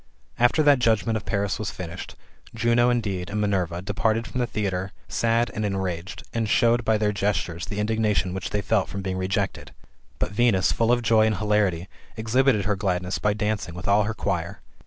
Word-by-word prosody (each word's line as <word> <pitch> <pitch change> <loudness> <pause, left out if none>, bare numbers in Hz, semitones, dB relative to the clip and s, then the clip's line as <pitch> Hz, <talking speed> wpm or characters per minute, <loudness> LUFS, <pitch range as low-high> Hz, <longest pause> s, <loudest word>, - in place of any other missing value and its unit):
After 120 +6 +4
that 145 -3 +5
judgment 115 -1 +2
of 110 - -4
Paris 100 -1 -1
was 105 - -2
finished, 85 -1 -7 0.4
Juno 120 +1 +3
indeed, 100 -7 -1
and 105 - -2
Minerva, 90 -4 -1
departed 110 +3 0
from 125 - -5
the 120 - +1
theatre 95 -3 -3
sad 115 +1 +1
and 110 - -3
enraged, 95 -2 -3
and 115 -2 -1
showed 120 0 +3
by 110 -1 +2
their 105 -1 +1
gestures 95 -3 -2
the 100 - -5
• - - -3
indignation 105 -3 0
which 95 +2 -4
they 105 - -1
felt 105 -2 +1
from 100 0 -5
being 95 -1 -2
rejected; 95 +1 -2 0.4
but - - -2
Venus, 100 -3 +3
full 115 0 +2
of 120 0 +2
joy 110 -1 +4
and 110 -3 0
hilarity, 105 -5 +1 0.3
exhibited 115 -1 +2
her 105 +1 +1
gladness 90 -2 -1
by 105 - +1
dancing 105 -4 -2
with 90 - -6
all 100 +1 +4
her 115 +1 -3
choir. - - -2
105 Hz, 195 wpm, -24 LUFS, 95-115 Hz, 0.4 s, that